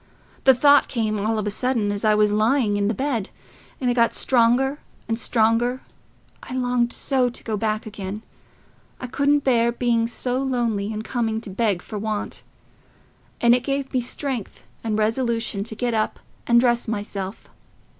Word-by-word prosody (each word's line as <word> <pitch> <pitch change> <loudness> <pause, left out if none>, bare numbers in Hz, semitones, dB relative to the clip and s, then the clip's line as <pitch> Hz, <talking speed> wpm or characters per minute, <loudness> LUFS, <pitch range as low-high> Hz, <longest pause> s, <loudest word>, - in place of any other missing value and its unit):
The 265 -1 +7
thought 285 +3 +5
came 215 -3 -1
all 220 +1 0
of 215 - -2
a 210 - -1
sudden, 230 -2 0
as 205 0 -3
I 215 -1 +4
was 210 0 +3
lying 215 +1 +2
in 200 0 +1
the 220 - 0
bed, 250 -5 -2 0.5
and 255 - -1
it 245 - +3
got 235 -1 +2
stronger 260 +3 +2 0.3
and 225 - 0
stronger... 235 +3 +1 0.6
I 255 - -7
longed 245 -1 +1
so 260 -3 +1
to 240 - -11
go 220 - -2
back 215 0 -1
again... 205 0 -6 0.8
I - - -5
couldn't 285 +3 +1
bear 235 -3 +3
being 235 -1 +1
so 250 +2 -2
lonely 235 -6 -1
and 215 0 -4
coming 225 -2 -1
to 210 - -8
beg 200 -3 0
for 210 - -6
want. 215 0 -3 1.0
And 235 0 +6
it 250 - +3
gave 275 +1 -3
me 255 - +2
strength 250 -2 -4 0.2
and 220 -2 -1
resolution 225 -2 0
to 220 - -2
get 240 +1 -1
up 215 -1 -1 0.3
and 235 0 +6
dress 240 -1 +2
myself. 205 -2 -5
230 Hz, 175 wpm, -23 LUFS, 215-250 Hz, 1.0 s, The